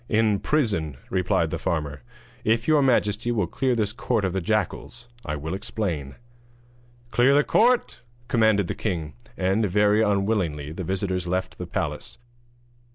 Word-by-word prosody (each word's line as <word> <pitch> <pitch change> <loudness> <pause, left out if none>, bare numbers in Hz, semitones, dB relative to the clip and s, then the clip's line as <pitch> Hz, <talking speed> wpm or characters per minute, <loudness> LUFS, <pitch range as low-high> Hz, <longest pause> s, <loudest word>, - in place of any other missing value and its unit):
'In 110 -2 +2
prison,' 100 - 0
replied - - +1
the - - -3
farmer; 75 -3 -2 0.4
'if 115 +1 +1
your 155 -2 +5
majesty 120 -3 +2
will 105 -5 +1
clear 130 +8 0
this 110 -2 0
court 115 -3 0
of 90 - -1
the 95 - -1
jackals 110 +5 -2 0.2
I 75 - -3
will 80 +4 -5
explain.' 90 -8 -3 1.0
'Clear 130 +4 +4
the 145 - +5
court!' 245 - +2 0.3
commanded 110 -4 +3
the - - -3
king; 80 -5 -3 0.2
and, 95 +4 +1
very 105 +3 +3
unwillingly, 100 -8 0
the 95 +4 -5
visitors 95 0 -2
left 95 +1 -2
the - - -5
palace. - - -4
100 Hz, 150 wpm, -25 LUFS, 85-115 Hz, 1.0 s, your